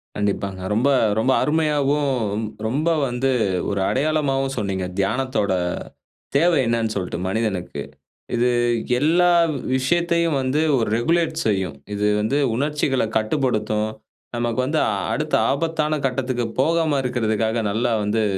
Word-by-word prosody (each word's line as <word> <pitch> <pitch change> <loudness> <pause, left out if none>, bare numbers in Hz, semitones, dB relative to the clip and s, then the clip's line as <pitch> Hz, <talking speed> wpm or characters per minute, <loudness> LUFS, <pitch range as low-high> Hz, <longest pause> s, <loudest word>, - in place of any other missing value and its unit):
கண்டிப்பாங்க. 100 -2 -2
ரொம்ப 125 +6 +2 0.3
ரொம்ப 130 +4 +2
அருமையாவும், 145 -3 +1 0.2
ரொ 110 0 -5
ரொம்ப 145 +8 0 0.2
வந்து 125 +2 0 0.4
ஒரு 100 - -1
அடையாளமாவும் 135 -2 0
சொன்னீங்க. 95 -3 -2
தியானத்தோட 110 0 0 0.8
தேவை 170 +2 +4
என்னென்னு 115 -1 0
சொல்ட்டு 90 -3 -3
மனிதனுக்கு. 95 -3 -2 0.5
இது 120 +1 +2 0.5
எல்லா 175 +4 +4 0.4
விஷயத்தையும் 170 +3 +1
வந்து 130 +4 0 0.2
ஒரு 115 - 0
ரெகுலேட் 165 +4 +1
செய்யும். 95 -7 -1 0.2
இது 105 - -1 0.2
வந்து 130 +7 0 0.2
உணர்ச்சிகள 145 0 0
கட்டுப்படுத்தும். 110 -3 0 0.5
நமக்கு 120 0 -1
வந்து 155 +4 0 0.3
அடுத்த 155 0 -1 0.2
ஆபத்தான 155 +1 0
கட்டத்துக்கு 125 -2 -1 0.2
போகாம 160 -1 +2
இருக்றதுக்காக, 115 -2 0
நல்லா 115 +3 0
வந்து 110 +2 0
130 Hz, 115 wpm, -22 LUFS, 110-150 Hz, 0.8 s, தேவை